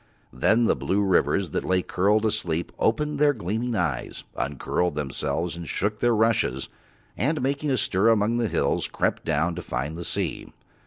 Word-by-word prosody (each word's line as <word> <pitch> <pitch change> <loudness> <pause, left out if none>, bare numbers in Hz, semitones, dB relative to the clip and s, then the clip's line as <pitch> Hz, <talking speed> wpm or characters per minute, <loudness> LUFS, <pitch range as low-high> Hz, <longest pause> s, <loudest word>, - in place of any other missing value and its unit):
Then 110 - +3
the - - +3
blue 100 +2 0
rivers 95 -2 +2
that - - -1
lay 90 0 +1
curled 105 +4 +2
asleep 90 -6 -1
opened 150 +6 +1
their 145 -1 +5
gleaming 115 +2 -2
eyes, - - -2
uncurled 70 +5 -1
themselves 75 +3 -2
and 85 -1 -7
shook 105 +2 -1
their 120 +1 +3
rushes, 105 - +1 0.5
and, 150 - 0
making 140 +3 -1
a 130 - +2
stir 100 +1 +2
among 115 +1 +2
the 120 -2 +1
hills, - - 0
crept - - -1
down 80 +2 +1
to - - -5
find 70 +5 -3
the 85 - -6
sea. - - -2
105 Hz, 170 wpm, -25 LUFS, 85-115 Hz, 0.5 s, their